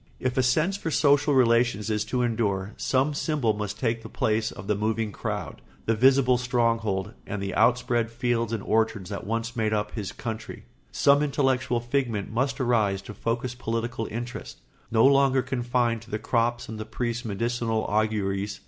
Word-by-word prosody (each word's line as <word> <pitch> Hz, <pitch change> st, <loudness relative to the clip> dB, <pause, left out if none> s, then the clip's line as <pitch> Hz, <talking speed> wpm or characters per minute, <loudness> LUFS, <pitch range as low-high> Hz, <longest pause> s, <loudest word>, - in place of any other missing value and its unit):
If 130 Hz, -1 st, -1 dB
a 130 Hz, -, +3 dB
sense 155 Hz, +10 st, +2 dB
for 165 Hz, -, -4 dB
social 145 Hz, -1 st, +3 dB
relations 115 Hz, -3 st, +3 dB
is 105 Hz, 0 st, 0 dB
to 125 Hz, -1 st, 0 dB
endure, 105 Hz, -4 st, -1 dB
some 135 Hz, +3 st, +1 dB
symbol 145 Hz, -7 st, 0 dB
must 105 Hz, -1 st, -4 dB
take 115 Hz, 0 st, -1 dB
the -, -, -9 dB
place 110 Hz, 0 st, 0 dB
of 95 Hz, -, -9 dB
the 105 Hz, -, +1 dB
moving 110 Hz, +1 st, -1 dB
crowd, -, -, -5 dB, 0.2 s
the 115 Hz, -, +2 dB
visible 130 Hz, +1 st, +4 dB
stronghold, 115 Hz, -5 st, 0 dB
and 105 Hz, -, -3 dB
the 100 Hz, 0 st, -3 dB
outspread 120 Hz, 0 st, +2 dB
fields 115 Hz, -1 st, -1 dB
and 110 Hz, -4 st, -2 dB
orchards 110 Hz, -3 st, 0 dB
that 100 Hz, -1 st, -5 dB
once 115 Hz, +1 st, -2 dB
made 110 Hz, -2 st, 0 dB
up 105 Hz, 0 st, -1 dB
his 105 Hz, -4 st, -4 dB
country; 110 Hz, -2 st, -6 dB, 0.3 s
some 140 Hz, +1 st, +4 dB
intellectual 135 Hz, -4 st, +1 dB
figment 120 Hz, -4 st, -2 dB
must 130 Hz, +3 st, -1 dB
arise 110 Hz, -6 st, +1 dB
to 105 Hz, -, -8 dB
focus 115 Hz, +4 st, -2 dB
political 115 Hz, -1 st, -3 dB
interests, 120 Hz, +3 st, -6 dB, 0.3 s
no 115 Hz, +1 st, +4 dB
longer 135 Hz, -1 st, +4 dB
confined 120 Hz, -2 st, 0 dB
to 115 Hz, -, -15 dB
the 105 Hz, -, -2 dB
crops 120 Hz, +1 st, 0 dB
and 110 Hz, -1 st, -7 dB
the 110 Hz, -, -4 dB
priest's 120 Hz, +1 st, -3 dB
medicinal 115 Hz, +1 st, -1 dB
auguries. 105 Hz, -2 st, -1 dB
115 Hz, 175 wpm, -26 LUFS, 110-125 Hz, 0.3 s, visible